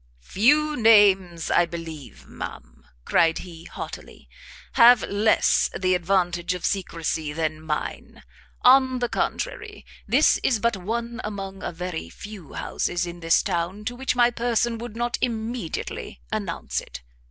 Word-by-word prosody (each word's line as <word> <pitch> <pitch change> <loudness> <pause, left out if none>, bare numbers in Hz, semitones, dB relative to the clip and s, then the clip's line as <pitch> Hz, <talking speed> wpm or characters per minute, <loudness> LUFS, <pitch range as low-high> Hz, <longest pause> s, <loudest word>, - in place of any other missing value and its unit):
"Few 295 - +3
names, 195 - +4
I 175 - +4
believe, 165 -4 -9
ma'am," - - -9 0.2
cried 165 -1 +3
he, 170 -2 -9
haughtily, - - -9 0.5
"have 235 0 +7
less 205 +2 +2
the 185 -1 +2
advantage 175 -1 0
of 180 - -5
secrecy 165 -5 -2
than 155 0 -2
mine! 155 -1 -5 0.4
on 260 0 +6
the 245 -1 -1
contrary, - - -3 0.2
this - - +4
is 245 - +2
but 235 0 +1
one 235 +5 -4
among 195 -2 -6
a - - -4
very 180 -1 -5
few 200 -8 -11
houses 175 +1 -2
in 175 0 -8
this 165 -1 +3
town 175 +5 -2
to 245 - -3
which 265 0 -1
my 240 0 +4
person 235 -1 0
would 235 -2 -7
not 240 +1 -2
immediately 225 - -4
announce - - -3
it. - - -11
195 Hz, 140 wpm, -24 LUFS, 170-235 Hz, 0.5 s, have